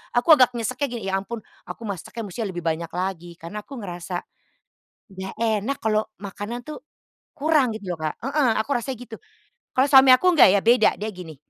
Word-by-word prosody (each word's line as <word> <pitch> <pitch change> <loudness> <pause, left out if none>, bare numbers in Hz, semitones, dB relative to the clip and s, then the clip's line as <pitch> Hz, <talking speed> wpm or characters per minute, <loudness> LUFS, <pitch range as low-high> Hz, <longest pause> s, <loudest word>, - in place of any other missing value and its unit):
Aku 250 +7 +4
agak 250 -2 +4
nyeseknya, 255 +5 -2
gini, 235 -4 -5
"Ya 195 - +1
ampun, 230 +4 -6 0.3
aku - - -8
masaknya 205 +4 -6
musti 195 +5 -6
lebih 175 -3 -6
banyak 165 0 -1
lagi," 175 -1 -4
Karena 205 +6 -7
aku 275 - -10
ngerasa, 175 -1 -5 0.9
enggak 190 0 -7
enak 225 +4 0
kalau 215 0 +2 0.2
makanan 205 +4 -6
tuh 305 - -7 0.6
kurang, 290 -5 +2
gitu 185 -4 -5
loh, - - -7
Kak, - - -9
heeh, 280 -3 +2
aku 220 - -3
rasanya 245 +1 -3
gitu. 225 - -10 0.6
Kalau 260 +2 +4
suami 265 -1 +8
aku 370 - -3
enggak, 290 - +8
ya 200 - +3
beda 235 -1 +5
dia, 215 +2 -3
gini, 165 -5 -10
220 Hz, 190 wpm, -23 LUFS, 185-255 Hz, 0.9 s, suami